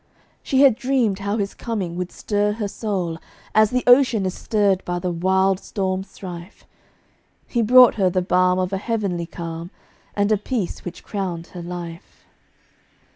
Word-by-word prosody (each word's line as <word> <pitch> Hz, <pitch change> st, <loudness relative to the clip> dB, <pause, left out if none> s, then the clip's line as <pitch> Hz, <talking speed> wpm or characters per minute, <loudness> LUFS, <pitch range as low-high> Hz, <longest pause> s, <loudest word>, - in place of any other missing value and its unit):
She 265 Hz, 0 st, +1 dB
had 275 Hz, -3 st, +7 dB
dreamed 250 Hz, -6 st, 0 dB
how 200 Hz, +2 st, -2 dB
his 200 Hz, -2 st, -2 dB
coming 200 Hz, -8 st, -4 dB
would 180 Hz, 0 st, -4 dB
stir 205 Hz, 0 st, -1 dB
her 210 Hz, -1 st, -3 dB
soul, 190 Hz, -6 st, -3 dB, 0.3 s
As 215 Hz, -1 st, +5 dB
the 250 Hz, +1 st, 0 dB
ocean 245 Hz, -5 st, +5 dB
is 185 Hz, -, -1 dB
stirred 200 Hz, -3 st, +1 dB
by 175 Hz, 0 st, -3 dB
the 180 Hz, 0 st, -2 dB
wild 190 Hz, +2 st, +2 dB
storm's 190 Hz, -2 st, -3 dB
strife: 180 Hz, -1 st, -10 dB, 0.8 s
He 240 Hz, -, -1 dB
brought 250 Hz, +2 st, +7 dB
her 185 Hz, -, +4 dB
the 180 Hz, 0 st, 0 dB
balm 180 Hz, 0 st, +3 dB
of 185 Hz, +1 st, -1 dB
a 195 Hz, -, -1 dB
heavenly 195 Hz, -7 st, -2 dB
calm, 165 Hz, 0 st, -6 dB, 0.5 s
And 205 Hz, +1 st, +1 dB
a 215 Hz, -, +4 dB
peace 210 Hz, -2 st, -3 dB
which 180 Hz, -, -8 dB
crowned 180 Hz, -5 st, -4 dB
her 175 Hz, -, -7 dB
life. 175 Hz, 0 st, -8 dB
195 Hz, 165 wpm, -22 LUFS, 180-215 Hz, 0.8 s, had